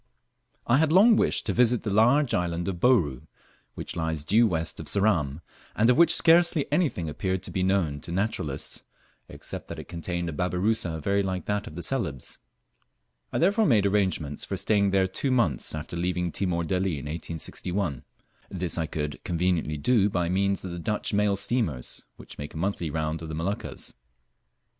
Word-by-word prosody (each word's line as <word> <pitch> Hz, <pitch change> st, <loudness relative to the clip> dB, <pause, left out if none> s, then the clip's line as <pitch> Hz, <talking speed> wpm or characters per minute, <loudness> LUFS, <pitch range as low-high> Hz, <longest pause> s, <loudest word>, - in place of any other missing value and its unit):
I 120 Hz, +4 st, +3 dB
HAD 160 Hz, -1 st, +2 dB
long 210 Hz, +6 st, +7 dB
wished -, -, +1 dB
to 100 Hz, -, 0 dB
visit 120 Hz, 0 st, +3 dB
the 105 Hz, -, -2 dB
large 125 Hz, +6 st, +4 dB
island 85 Hz, 0 st, -1 dB
of 90 Hz, -3 st, -3 dB
Bouru, 85 Hz, -, +2 dB, 0.5 s
which -, -, -6 dB
lies 80 Hz, -3 st, -2 dB
due 110 Hz, +9 st, +4 dB
west 85 Hz, -4 st, -2 dB
of -, -, -7 dB
Ceram, 85 Hz, -8 st, +1 dB, 0.3 s
and 115 Hz, +3 st, +4 dB
of 125 Hz, -, +2 dB
which 170 Hz, -, +6 dB
scarcely 170 Hz, -2 st, +4 dB
anything 140 Hz, -, 0 dB
appeared 95 Hz, +4 st, -2 dB
to -, -, -6 dB
be 95 Hz, -, -1 dB
known 90 Hz, -6 st, +1 dB
to 85 Hz, -, -5 dB
naturalists, 90 Hz, -7 st, -3 dB, 0.5 s
except -, -, -8 dB
that -, -, -7 dB
it -, -, -8 dB
contained 85 Hz, +1 st, -4 dB
a 80 Hz, -, -4 dB
babirusa 90 Hz, 0 st, -1 dB
very 100 Hz, +3 st, +2 dB
like 95 Hz, -2 st, -3 dB
that 105 Hz, 0 st, -2 dB
of 75 Hz, -, -9 dB
Celebes. 95 Hz, -, -3 dB, 0.9 s
I -, -, -1 dB
therefore 200 Hz, +5 st, +3 dB
made 105 Hz, -6 st, +4 dB
arrangements 95 Hz, -8 st, 0 dB
for -, -, -4 dB
staying 100 Hz, -2 st, +2 dB
there 95 Hz, -1 st, +3 dB
two 95 Hz, +9 st, -2 dB
months 115 Hz, -, +1 dB
after 80 Hz, +2 st, -6 dB
leaving 90 Hz, 0 st, -1 dB
Timor 85 Hz, -2 st, -1 dB
Delli 90 Hz, 0 st, -1 dB
in 70 Hz, -, -7 dB
1861. 85 Hz, 0 st, -4 dB, 0.5 s
This 90 Hz, -1 st, -1 dB
I 80 Hz, -, -1 dB
could 75 Hz, -1 st, -4 dB
conveniently 85 Hz, -3 st, 0 dB
do 105 Hz, +5 st, +3 dB
by 90 Hz, -3 st, -1 dB
means 100 Hz, +1 st, 0 dB
of 90 Hz, -, -5 dB
the 85 Hz, -, -5 dB
Dutch 105 Hz, +6 st, -2 dB
mail 105 Hz, -1 st, +2 dB
steamers, 95 Hz, -, -1 dB
which -, -, -12 dB
make 75 Hz, +2 st, -7 dB
a -, -, -5 dB
monthly 90 Hz, -1 st, -2 dB
round 80 Hz, +1 st, -2 dB
of 80 Hz, -, -6 dB
the 80 Hz, -, -4 dB
Moluccas. 90 Hz, +6 st, -4 dB
95 Hz, 180 wpm, -26 LUFS, 80-105 Hz, 0.9 s, long